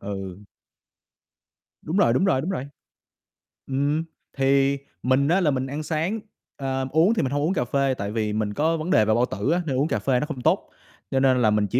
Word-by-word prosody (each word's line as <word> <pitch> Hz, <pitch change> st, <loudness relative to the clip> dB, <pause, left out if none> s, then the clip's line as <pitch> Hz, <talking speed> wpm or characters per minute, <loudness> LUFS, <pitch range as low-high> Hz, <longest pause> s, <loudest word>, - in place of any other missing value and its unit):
Ừ. 95 Hz, -2 st, -6 dB, 1.5 s
Đúng 165 Hz, +5 st, -3 dB
rồi, 205 Hz, -, +4 dB
đúng 190 Hz, -, +2 dB
rồi, 135 Hz, -9 st, +2 dB
đúng 165 Hz, -, -3 dB
rồi. 140 Hz, -9 st, -3 dB, 1.0 s
Ừm, 145 Hz, +4 st, 0 dB, 0.3 s
thì 135 Hz, +1 st, +3 dB, 0.3 s
mình 130 Hz, +2 st, +2 dB
á, 175 Hz, +5 st, +3 dB
là 155 Hz, -5 st, +3 dB
mình 130 Hz, -1 st, -2 dB
ăn 145 Hz, +3 st, -4 dB
sáng, 165 Hz, +8 st, -1 dB, 0.4 s
ờ, 135 Hz, -1 st, -2 dB
uống 165 Hz, +8 st, +4 dB
thì 230 Hz, -, 0 dB
mình 135 Hz, -3 st, -1 dB
hông 145 Hz, -, 0 dB
uống 165 Hz, +6 st, +1 dB
cà 125 Hz, -8 st, 0 dB
phê, 135 Hz, +2 st, +1 dB
tại 100 Hz, +1 st, -4 dB
vì 105 Hz, -1 st, -1 dB
mình 105 Hz, -1 st, -1 dB
có 160 Hz, +5 st, +1 dB
vấn 160 Hz, +2 st, -4 dB
đề 110 Hz, -, +5 dB
về 110 Hz, -, +2 dB
bao 120 Hz, -, +3 dB
tử 105 Hz, +6 st, -2 dB
á, 175 Hz, +2 st, +2 dB
nên 135 Hz, -5 st, -1 dB
uống 140 Hz, +3 st, +2 dB
cà 110 Hz, -, -1 dB
phê 125 Hz, +4 st, +1 dB
nó 150 Hz, -, -1 dB
không 150 Hz, -5 st, -6 dB
tốt, -, -, +1 dB, 0.4 s
cho 135 Hz, -, +2 dB
nên 130 Hz, -2 st, +3 dB
là 110 Hz, -, +4 dB
mình 105 Hz, -1 st, +2 dB
chỉ 120 Hz, -, +1 dB
135 Hz, 230 wpm, -24 LUFS, 120-155 Hz, 1.5 s, đề